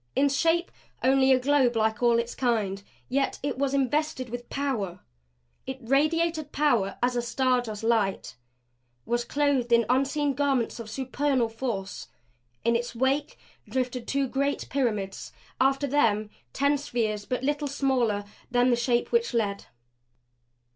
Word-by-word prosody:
In 285 Hz, +1 st, +3 dB
shape 330 Hz, +5 st, +1 dB, 0.3 s
only 265 Hz, 0 st, +4 dB
a 260 Hz, -, +5 dB
globe 260 Hz, -2 st, +3 dB
like 220 Hz, 0 st, +1 dB
all 235 Hz, -1 st, +4 dB
its 235 Hz, 0 st, -2 dB
kind, 215 Hz, -6 st, 0 dB, 0.3 s
yet 275 Hz, +2 st, 0 dB
it 285 Hz, -2 st, -2 dB
was 280 Hz, 0 st, +1 dB
invested 275 Hz, -1 st, 0 dB
with 245 Hz, 0 st, -6 dB
power; 235 Hz, -11 st, -2 dB, 0.7 s
it 265 Hz, 0 st, -4 dB
radiated 310 Hz, +4 st, +1 dB
power 240 Hz, -10 st, +1 dB
as 250 Hz, 0 st, +2 dB
a 240 Hz, -, +1 dB
star 250 Hz, +1 st, +1 dB
does 220 Hz, -2 st, -7 dB
light; 220 Hz, -4 st, 0 dB, 0.7 s
was 240 Hz, +1 st, 0 dB
clothed 280 Hz, -3 st, 0 dB
in 235 Hz, -1 st, +5 dB
unseen 275 Hz, +2 st, +1 dB
garments 270 Hz, -4 st, 0 dB
of 225 Hz, -2 st, -7 dB
supernal 265 Hz, 0 st, 0 dB
force. 225 Hz, -5 st, -4 dB, 0.6 s
In 235 Hz, -, +3 dB
its 240 Hz, 0 st, -2 dB
wake 270 Hz, +4 st, 0 dB, 0.3 s
drifted 250 Hz, -2 st, -2 dB
two 275 Hz, -1 st, 0 dB
great 280 Hz, +2 st, -1 dB
pyramids; 215 Hz, -8 st, -2 dB, 0.3 s
after 270 Hz, +2 st, +2 dB
them 220 Hz, -7 st, +1 dB, 0.2 s
ten 280 Hz, -, +1 dB
spheres 220 Hz, -6 st, -2 dB
but 250 Hz, 0 st, -2 dB
little 290 Hz, +1 st, 0 dB
smaller 255 Hz, -7 st, 0 dB, 0.2 s
than 245 Hz, 0 st, +3 dB
the -, -, +4 dB
Shape 240 Hz, 0 st, 0 dB
which 465 Hz, -, +1 dB
led. 200 Hz, -3 st, -1 dB
255 Hz, 145 wpm, -27 LUFS, 235-280 Hz, 0.7 s, a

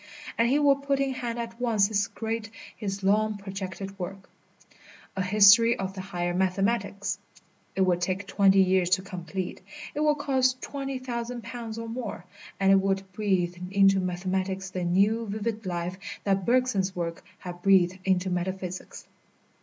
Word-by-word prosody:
And 230 Hz, +1 st, +3 dB
he 275 Hz, -, +3 dB
would 280 Hz, -1 st, +4 dB
put 280 Hz, -1 st, 0 dB
in 275 Hz, -1 st, 0 dB
hand 240 Hz, -2 st, -4 dB
at 230 Hz, 0 st, -6 dB
once 220 Hz, -5 st, +3 dB
his 205 Hz, -2 st, +1 dB
great, 225 Hz, 0 st, -4 dB, 0.3 s
his 195 Hz, -2 st, -4 dB
long 210 Hz, +2 st, +2 dB
projected 195 Hz, 0 st, -6 dB
work, 195 Hz, +2 st, -7 dB, 0.8 s
"A 190 Hz, -, -1 dB
History 210 Hz, +5 st, +6 dB
of 190 Hz, -2 st, -3 dB
the 190 Hz, -, -6 dB
Higher 175 Hz, -2 st, -3 dB
Mathematics." 195 Hz, +1 st, 0 dB, 0.6 s
It 195 Hz, -, 0 dB
would 180 Hz, -2 st, +2 dB
take 185 Hz, +3 st, -1 dB
twenty 195 Hz, -1 st, +4 dB
years 185 Hz, -1 st, +2 dB
to 190 Hz, -, -9 dB
complete, 185 Hz, -1 st, -5 dB, 0.3 s
it -, -, -4 dB
would 300 Hz, -1 st, +3 dB
cost 260 Hz, -3 st, +1 dB
twenty 275 Hz, -1 st, -4 dB
thousand 240 Hz, -1 st, -5 dB
pounds 230 Hz, -1 st, -6 dB
or 230 Hz, 0 st, -5 dB
more, 225 Hz, -6 st, -5 dB, 0.3 s
and 195 Hz, 0 st, +4 dB
it 195 Hz, 0 st, +6 dB
would 195 Hz, 0 st, -1 dB
breathe 185 Hz, -4 st, 0 dB, 0.2 s
into 195 Hz, 0 st, +5 dB
mathematics 190 Hz, +1 st, -2 dB
the 185 Hz, -1 st, -3 dB
new, 205 Hz, +6 st, +2 dB
vivid 215 Hz, 0 st, -3 dB
life 175 Hz, +1 st, -3 dB, 0.2 s
that 195 Hz, -2 st, 0 dB
Bergson's 235 Hz, -7 st, +2 dB
works 170 Hz, -1 st, -3 dB, 0.2 s
have 175 Hz, -1 st, -8 dB
breathed 185 Hz, -1 st, +4 dB
into 185 Hz, -1 st, +1 dB
metaphysics. 185 Hz, 0 st, -4 dB
195 Hz, 160 wpm, -27 LUFS, 185-230 Hz, 0.8 s, History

